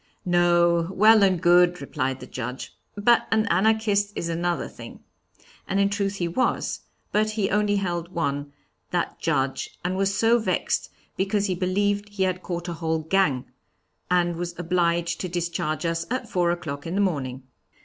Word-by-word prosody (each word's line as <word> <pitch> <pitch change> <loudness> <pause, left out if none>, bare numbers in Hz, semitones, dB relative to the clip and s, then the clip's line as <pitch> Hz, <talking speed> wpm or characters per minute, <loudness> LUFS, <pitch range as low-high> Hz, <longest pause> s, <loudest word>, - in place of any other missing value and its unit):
'No, 175 -1 +3
well 215 +3 +6
and 190 -3 +3
good,' 175 +1 +4
replied 135 -1 -3
the - - -7
Judge. 125 +1 -6 0.2
'But 235 +3 +3
an 220 -1 +2
Anarchist 205 +1 +2
is 170 - -3
another 170 +1 -1
thing.' - - -11 0.7
And 195 0 0
in 200 0 +2
truth 200 -1 -1
he 175 -3 -1
was; 190 +10 -1 0.3
but 215 +1 +2
he 215 -2 -1
only 210 0 +2
held 175 -3 -2
one, 145 -4 -2 0.4
that 175 -1 -2
Judge, 135 -4 -1
and 185 +1 0
was 195 +1 +1
so 230 +1 +4
vexed 220 - -1 0.3
because 200 +1 +1
he 190 - 0
believed 205 +3 0
he 205 -2 -2
had 185 -1 -1
caught 175 -1 -4
a 175 - -3
whole 160 -1 -2
gang, 160 -7 +1 0.6
and 175 -1 +2
was 175 0 -5
obliged 170 0 0
to 185 - -3
discharge 170 -2 -2
us 165 0 -1
at 255 0 -2
four 175 -4 +1
o'clock 155 -4 -4
in 170 - -3
the - - +1
morning. 135 -9 -2
175 Hz, 170 wpm, -25 LUFS, 170-200 Hz, 0.7 s, well